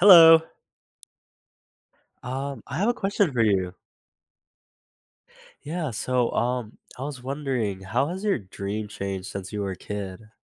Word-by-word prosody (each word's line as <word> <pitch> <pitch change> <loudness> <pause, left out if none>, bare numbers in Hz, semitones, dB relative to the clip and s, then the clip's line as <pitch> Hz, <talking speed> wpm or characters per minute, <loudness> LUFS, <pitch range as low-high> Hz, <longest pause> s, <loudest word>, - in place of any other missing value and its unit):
Hello. 165 -4 +10 1.8
Um, 135 +2 -4
I 135 - -4
have 205 +5 +2
a 240 - +3
question 195 - +1
for 120 -2 +2
you. 95 -4 +2 1.9
Yeah, 155 +1 -3
so, 125 +2 0
um, 120 -2 -1 0.2
I - - -6
was 140 -3 -5
wondering, 130 -8 -2
how 120 +9 0
has 185 +4 -5
your 205 -7 +2
dream 100 +1 -5
changed 95 -2 -4
since 100 0 -6
you 105 - -2
were 100 -1 -2
a 95 - -7
kid? 105 +2 -6
125 Hz, 140 wpm, -25 LUFS, 100-150 Hz, 1.9 s, Hello